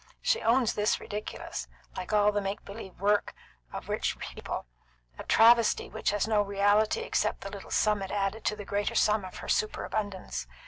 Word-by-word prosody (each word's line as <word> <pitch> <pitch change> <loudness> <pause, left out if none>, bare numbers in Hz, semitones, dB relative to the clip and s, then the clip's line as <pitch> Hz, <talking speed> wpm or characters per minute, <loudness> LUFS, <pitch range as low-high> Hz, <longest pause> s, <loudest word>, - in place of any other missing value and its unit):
She 465 - +2
owns 235 0 +3
this 210 0 +1
ridiculous, 205 - -6 0.3
like 185 - -5
all 210 0 +4
the 205 0 0
make 195 +1 -4
believe 200 -2 -9
work 205 +1 +1 0.4
of - - -7
rich - - -1
people; - - -6 0.5
a - - -5
travesty 230 0 +5
which - - -1
has 205 +1 0
no 215 -2 +3
reality 205 - +2
except 465 - 0
the - - -6
little - - -9
sum 210 -2 +2
it 195 - -4
added 205 +2 -1
to 210 - +1
the 205 -1 -8
greater 205 +1 -1
sum 210 -1 +3
of 185 - -8
her - - -8
superabundance. 205 - -2
205 Hz, 180 wpm, -29 LUFS, 200-215 Hz, 0.5 s, travesty